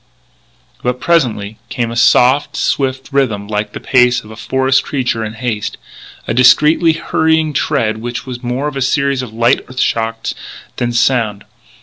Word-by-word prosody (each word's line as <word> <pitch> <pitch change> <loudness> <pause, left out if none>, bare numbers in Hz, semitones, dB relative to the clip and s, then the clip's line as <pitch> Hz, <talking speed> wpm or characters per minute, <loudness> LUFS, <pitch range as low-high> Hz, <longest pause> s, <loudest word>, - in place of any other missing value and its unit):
But, 125 0 -2
presently, 115 -11 0
came 120 -2 -2
a - - -5
soft, 130 +4 +3
swift 135 -1 -1
rhythm 110 -8 0
like 105 0 -3
the - - -6
pace 125 -1 +2
of 110 - -13
a - - -9
forest 130 +4 +1
creature 125 -5 -2
in 110 0 -5
haste 110 -2 -3 0.5
a - - 0
discreetly 150 +7 +5
hurrying 160 -1 0
tread 115 -8 0
which 120 +2 -5
was 125 -2 -7
more 135 +4 -3
a 135 - -3
series 140 0 +1
of 125 -4 -7
light 120 +3 +2
earth 130 0 -7
shocks 115 -1 -1 0.4
than 120 0 -1
sound. 120 -4 +1
125 Hz, 155 wpm, -15 LUFS, 115-135 Hz, 0.5 s, discreetly